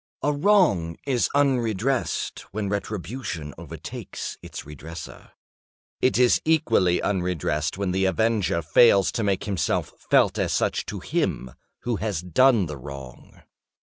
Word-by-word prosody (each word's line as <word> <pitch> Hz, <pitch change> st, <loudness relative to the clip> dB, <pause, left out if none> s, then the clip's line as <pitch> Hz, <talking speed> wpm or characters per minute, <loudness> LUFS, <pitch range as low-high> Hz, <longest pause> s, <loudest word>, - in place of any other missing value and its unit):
A 150 Hz, -, +2 dB
wrong 145 Hz, -, +3 dB
is 130 Hz, -4 st, +1 dB
unredressed 130 Hz, -3 st, 0 dB
when 100 Hz, 0 st, -3 dB
retribution 100 Hz, -, -4 dB
overtakes -, -, -7 dB
its -, -, -8 dB
redresser. 75 Hz, +3 st, -10 dB, 0.7 s
It 130 Hz, -, +3 dB
is 125 Hz, -1 st, +4 dB
equally 115 Hz, -, +3 dB
unredressed 90 Hz, -4 st, -1 dB
when 100 Hz, -2 st, -1 dB
the 95 Hz, +1 st, +1 dB
avenger 95 Hz, -2 st, +1 dB
fails 100 Hz, +4 st, +5 dB
to 115 Hz, -, -2 dB
make 100 Hz, -2 st, 0 dB
himself 100 Hz, -4 st, -1 dB, 0.2 s
felt -, -, +4 dB
as -, -, 0 dB
such -, -, 0 dB
to -, -, -5 dB
him 65 Hz, -, -2 dB, 0.3 s
who 120 Hz, -2 st, -1 dB
has 100 Hz, -6 st, -2 dB
done 110 Hz, -, +4 dB
the 75 Hz, -3 st, -6 dB
wrong. 70 Hz, -1 st, -11 dB
100 Hz, 130 wpm, -24 LUFS, 85-120 Hz, 0.7 s, fails